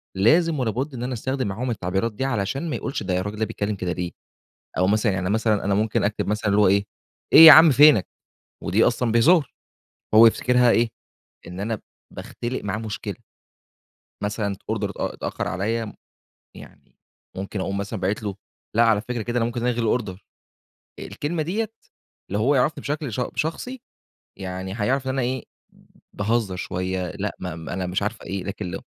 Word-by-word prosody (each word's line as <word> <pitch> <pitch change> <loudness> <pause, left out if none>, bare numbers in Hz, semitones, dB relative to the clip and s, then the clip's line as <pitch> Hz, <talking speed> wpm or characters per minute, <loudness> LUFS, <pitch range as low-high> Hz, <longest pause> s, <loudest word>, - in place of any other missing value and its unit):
لازم 155 - +3
ولا 115 -3 0
بُد 135 +6 -3
إن 120 -1 -5
أنا 125 +1 -3
أستخدم 130 0 -2
معاهم 120 +6 -3
التعبيرات 95 +2 -2
دي 135 +5 -3
علشان 135 - -2
ما - - -2
يقولش - - -4
ده 90 -1 -1
الراجل 105 +2 -4
ده 110 - +1
بيتكلم 105 0 -3
كده 90 -2 -3
ليه، 90 -1 -3 0.7
أو 90 +1 +3
مثلًا 105 +1 +2
يعني 95 0 -2
مثلًا 110 -1 +1
أنا 100 -1 +2
ممكن 110 +1 0
أكتب 105 +1 -1
مثلًا 105 -1 0
اللي 105 +1 +4
هو 100 - +5
إيه 100 +1 +3 0.5
إيه 160 -1 +12
عم 160 0 +9
فينك؟ 140 - +6 0.6
ودي 105 +6 +3
أصلًا 120 -1 +1
بهزار، 140 +5 +4 0.6
هو 115 +1 +9
يفتكرها 125 +1 +3
إيه 115 0 +3 0.6
إن 90 +2 -8
أنا 110 +1 -2 0.3
باختلق 120 0 -5
معاه 105 +1 -2
مشكلة. 110 -2 -5 1.1
مثلًا 105 -1 -2
أوردر - - -1
اتأ - - -4
اتأخر - - -4
عليّا 110 +3 -2 0.6
يعني - - -15 0.4
ممكن 95 +1 -4
أقوم 100 +1 -2
مثلًا 100 0 -4
باعت 100 +3 -1
له 100 -2 -4 0.4
لأ 115 - +4
على 110 -3 +3
فكرة 120 0 -4
كده 120 +2 -4
أنا 115 - +1
ممكن 120 0 -3
ألغي 120 -1 0
الأوردر، 105 -4 -1 0.8
آآ - - -6
الكلمة 155 +2 -3
ديّة 215 +6 -2 0.6
لو 100 - 0
هو 140 +6 +3
يعرَفني 145 +3 +1
بشكل 145 -5 -3
ش 125 - -2
شخصي 240 +11 -3 0.6
يعني 95 0 -5
هيعرف 130 +5 0
إن 130 - -1
أنا 135 -1 -1
إيه 125 0 -2 0.7
باهزر 105 -2 -1
شوية 90 0 -3
لأ 100 0 -4
ما 90 -2 -5
أنا 90 +3 -5
مش 95 +3 -1
عارف 110 +2 -3
إيه 95 -1 -5
لكن 100 -2 -5
ل - - -4
110 Hz, 180 wpm, -23 LUFS, 100-125 Hz, 1.1 s, إيه